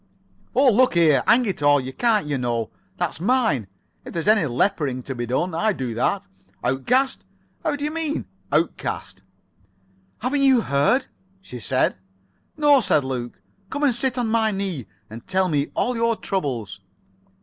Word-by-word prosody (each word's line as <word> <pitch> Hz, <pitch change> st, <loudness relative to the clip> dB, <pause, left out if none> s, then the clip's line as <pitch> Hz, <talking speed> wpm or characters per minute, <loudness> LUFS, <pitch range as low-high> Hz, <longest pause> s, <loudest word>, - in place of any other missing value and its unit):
"Oh, 265 Hz, -1 st, +5 dB
look 250 Hz, +1 st, +3 dB
here, 160 Hz, -4 st, +5 dB
hang 245 Hz, +1 st, +5 dB
it 195 Hz, -7 st, -3 dB
all, 145 Hz, 0 st, +5 dB
you 130 Hz, 0 st, -6 dB
can't, 225 Hz, -, +2 dB
you 145 Hz, -2 st, -2 dB
know. 120 Hz, -3 st, -2 dB, 0.3 s
That's -, -, -2 dB
mine. 190 Hz, -, +1 dB, 0.4 s
If -, -, -9 dB
there's 165 Hz, +1 st, -3 dB
any 210 Hz, -7 st, +4 dB
lepering 130 Hz, -1 st, 0 dB
to 135 Hz, -, -5 dB
be 120 Hz, -1 st, -4 dB
done, 165 Hz, +9 st, -1 dB
I 215 Hz, +6 st, +1 dB
do 130 Hz, -8 st, -4 dB
that. 195 Hz, -, -1 dB, 0.4 s
Outcast? 240 Hz, -, +1 dB, 0.4 s
How -, -, 0 dB
do 285 Hz, -, -6 dB
you 300 Hz, -, -1 dB
mean 315 Hz, -2 st, -2 dB, 0.3 s
outcast?" 155 Hz, +3 st, -2 dB, 1.0 s
"Haven't 275 Hz, +4 st, -1 dB
you 265 Hz, -3 st, +5 dB
heard?" 145 Hz, -, +2 dB, 0.3 s
she 125 Hz, -10 st, -9 dB
said. 105 Hz, -, 0 dB, 0.6 s
"No," 290 Hz, -3 st, +5 dB
said 150 Hz, -9 st, +2 dB
Luke. 125 Hz, -2 st, -5 dB, 0.3 s
"Come 285 Hz, +1 st, -3 dB
and 275 Hz, -4 st, +4 dB
sit 250 Hz, +2 st, -1 dB
on 245 Hz, -2 st, 0 dB
my 220 Hz, -1 st, +2 dB
knee, 190 Hz, -, -3 dB, 0.2 s
and 115 Hz, +2 st, -11 dB
tell 185 Hz, 0 st, +1 dB
me 145 Hz, -4 st, 0 dB
all 250 Hz, -, 0 dB
your 230 Hz, 0 st, +1 dB
troubles." 120 Hz, -, -3 dB
185 Hz, 165 wpm, -23 LUFS, -, 1.0 s, Oh